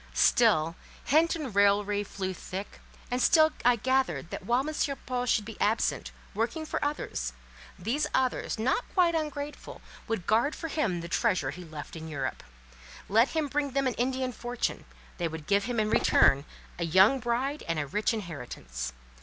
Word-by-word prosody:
Still, 165 -9 +4 0.3
hint 320 +5 +3
and 290 -9 -5
raillery 205 0 +3
flew 190 -2 -4
thick, 190 +2 -7 0.3
and 250 +1 0
still 315 +2 +5
I 245 0 +5
gathered 260 -5 0
that - - -5
while 250 +4 +2
M. 310 - -3 0.3
Paul 250 -1 -2
should 215 -4 +2
be 225 0 -9
absent, 220 +2 +1 0.2
working 230 +9 -2
for - - -3
others, 65 - -2 0.4
these 235 +11 -1
others, 255 -2 0
not 255 - +1
quite 350 -3 +4
ungrateful, 295 -2 -4 0.3
would 225 -6 -2
guard 235 +8 +2
for 325 - -5
him 205 - 0
the 170 - -6
treasure 170 - +1
he 180 +4 -9
left 155 -2 -9
in 160 0 -7
Europe. 135 -5 -3 0.7
Let 225 +5 +5
him 315 -2 -1
bring 285 -1 -1
them 275 0 +1
an 255 - +1
Indian 255 +1 -1
fortune: 240 +1 -3 0.3
they 170 - +1
would 160 -1 -7
give 200 +2 +2
him 245 -1 -1
in 215 0 +1
return 140 +2 +4 0.3
a - - 0
young 190 - +5
bride 255 +5 -1
and 165 -1 -1
a 150 - -1
rich 210 - 0
inheritance. 125 - -5
225 Hz, 170 wpm, -29 LUFS, 180-265 Hz, 0.7 s, still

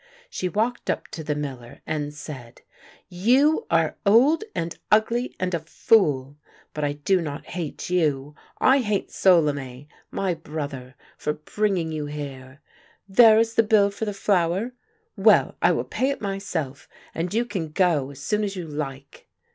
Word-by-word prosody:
She 185 - -2
walked 225 +7 -1
up - - -2
to 160 - -7
the 150 -1 -2
miller 130 -5 -7
and 150 -2 -3
said: 140 -5 -10 0.3
" - - -28 0.2
You 290 - +4
are - - +1
old 250 - +5
and 165 0 -3 0.2
ugly 230 +4 +2
and 185 0 -1
a 170 - +1
fool! 150 - +2 0.4
But 150 - -3
I 145 0 0
do 175 +6 +1
not 145 -3 -5
hate 175 -1 -5
you; 150 -5 0 0.2
I 270 +2 +4
hate 210 -5 -1
Solime, 145 -7 +2 0.2
my 190 -2 -1
brother, 145 -5 -6 0.2
for 150 - -1
bringing 175 +1 -1
you 150 -2 -3
here. 140 -2 -8 0.5
There 220 +2 +7
is 225 0 +2
the 230 - +5
bill 210 -2 +3
for 205 +2 -4
the 210 - -2
flour? 195 +3 +1 0.4
Well, - - +4
I - - +5
will - - 0
pay 265 - -1
it 280 - -2
my 195 -2 -3
self 155 -8 -5
— - - -25
and 170 +2 -3
you 230 +3 +1
can 190 -9 -4
go 155 -5 +2
as 140 -1 -11
soon 210 +9 -1
as 200 -1 -3
you 180 -2 -5
like 140 -2 -7
170 Hz, 170 wpm, -24 LUFS, 145-210 Hz, 0.5 s, There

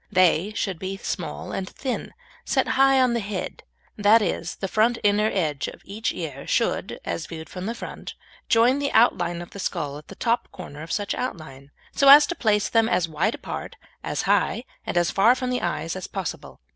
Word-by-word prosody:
They 185 0 +3
should 190 -6 -2
be 190 +1 -4
small 75 - -5
and 190 -1 -4
thin, 260 -2 -3
and - - -16 0.3
set - - 0
high 270 0 +4
on 255 -2 +3
the 235 - +1
head; 200 -3 -5 0.4
that 210 +2 +6
is, 175 -4 -2
the 195 - -4
front 225 +4 +2
inner 210 +1 +3
edge 155 -7 -1
of - - -10
each 215 +3 -2
ear 145 -5 -6
should, - - 0
as 85 0 -3
viewed 160 -1 -8
from 185 +1 -6
the 230 - -3
front, - - -8 0.3
join 240 +4 +4
the 285 0 -1
outline 175 -7 +3
of 175 - -14
the 200 - -9
skull 150 -6 -3
at 150 - -18
the 195 - -11
top 235 +3 0
corner 150 -5 -9
of 160 +1 -8
such 205 -1 -1
outline, 140 - -6 0.2
so 275 - +4
as 295 +2 +10
to 345 - -3
place 210 -6 +2
them 225 0 +2
as 180 -1 +1
wide 165 +8 0
apart, - - -7 0.3
as - - -2
high, - - +1 0.2
and - - -1
as 175 -1 +2
far 230 +6 +5
from 255 -1 -3
the 250 - -1
eyes 170 -1 -2
as 185 - -5
possible. 190 - -6
195 Hz, 210 wpm, -24 LUFS, 170-230 Hz, 0.4 s, as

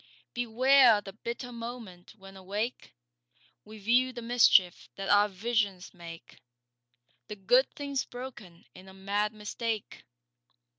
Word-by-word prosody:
Beware 245 0 +4
the 195 -1 -10
bitter 235 +3 -6
moment 230 -6 -9
when 195 -2 -14
awake 205 - -5 0.7
We 215 +1 -12
view 240 +5 +2
the 240 -2 -8
mischief 230 -6 +3
that 195 0 -5
our 205 +1 +5
visions 200 -2 -2
make— 165 -6 -12 0.9
The 210 - -7
good 245 +7 +3
things 280 -2 -3
broken 245 -9 -11
in 185 +1 -14
a 190 - -15
mad 200 +2 -1
mistake. 220 0 -5
215 Hz, 120 wpm, -29 LUFS, 195-240 Hz, 0.9 s, our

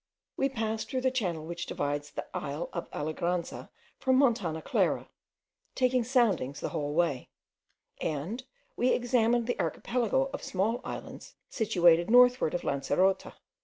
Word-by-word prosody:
We 270 - +1
passed 220 -3 -3
through 260 -1 -1
the 260 0 +2
channel 180 -11 -2
which 170 +1 -5
divides 145 0 -2
the - - -6
isle 145 +5 -3
of 170 - -5
Alegranza 170 +3 -3 0.3
from 260 -1 +2
Montana 225 - +2
Clara, - - +1 0.7
taking 255 -1 +2
soundings 225 - +1
the - - -3
whole 150 -3 -3
way; 165 -7 0 0.7
and 165 - -3 0.3
we 250 +1 +2
examined 240 -1 +2
the 245 - -2
archipelago 255 +3 0
of - - -4
small 210 +6 -1
islands - - -8 0.2
situated 175 -6 +3
northward 245 -7 +5
of 175 - -2
Lancerota. 185 +8 +1
200 Hz, 135 wpm, -29 LUFS, 165-245 Hz, 0.7 s, northward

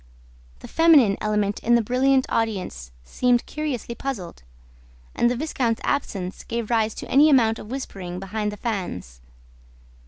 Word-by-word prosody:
The - - -9
feminine 300 -11 +5
element 210 -1 0
in 240 +1 +3
the 235 - +4
brilliant 260 +3 +2
audience 185 - -2
seemed 245 - +1
curiously 290 -7 -4
puzzled; 230 - -6 0.7
and 240 - +2
the 245 - 0
viscount's 250 -5 -1
absence 190 -10 -2
gave 235 -1 -4
rise 220 -2 +1
to - - -7
any 290 +3 +5
amount 230 -6 +3
of 210 - -10
whispering 190 -9 -6
behind 210 +2 -3
the 210 - -8
fans. 175 - -5
225 Hz, 145 wpm, -23 LUFS, 200-255 Hz, 0.7 s, feminine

